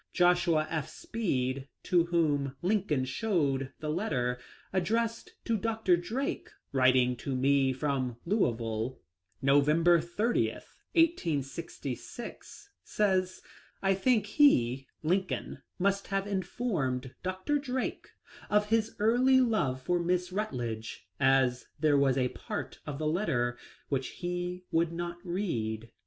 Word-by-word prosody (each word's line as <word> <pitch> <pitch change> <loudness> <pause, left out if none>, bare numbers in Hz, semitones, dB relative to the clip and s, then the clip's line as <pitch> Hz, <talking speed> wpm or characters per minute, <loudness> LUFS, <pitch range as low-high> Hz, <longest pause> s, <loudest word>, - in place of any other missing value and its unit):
Joshua 175 -3 +3
F. 155 -3 -2
Speed, 140 - -2 0.2
to 175 -2 +3
whom 145 -6 +1
Lincoln 180 -9 +1
showed 140 - 0
the 155 - -3
letter 125 - -1 0.3
addressed 225 +5 -1
to 230 - +1
Dr. 220 -3 +2
Drake, 220 +11 -3 0.2
writing 130 -1 +4
to 135 +2 -3
me 135 +1 +3
from 130 -3 -1
Louisville, 115 - 0 0.4
Novem 145 +4 +4
ber 170 -1 +6
30, 210 +8 0 0.4
1866, 170 - -2
says: 185 -3 0 0.2
" - - -29
I 195 0 +4
think 215 +2 +2
he 135 - +3 0.2
(Lincoln) 185 +4 -1 0.2
must 200 +1 +1
have 195 0 -1
informed 180 - -2
Dr. 185 +11 -1
Drake 260 -2 -3 0.4
of 210 0 +2
his 225 0 +1
early 250 +5 +4
love 180 - +1
for 175 +4 +1
Miss 180 +1 0
Rutledge, 120 - -4
as 130 -2 +3
there 150 -1 +4
was 140 -2 +3
a 125 -1 +2
part - - -6
of 145 -2 -4
the 155 - -3
letter 135 -8 0 0.3
which 135 -2 0
he 180 0 -4
would 165 0 +2
not 170 0 -4
read." 115 - -3
170 Hz, 120 wpm, -30 LUFS, 135-205 Hz, 0.4 s, ber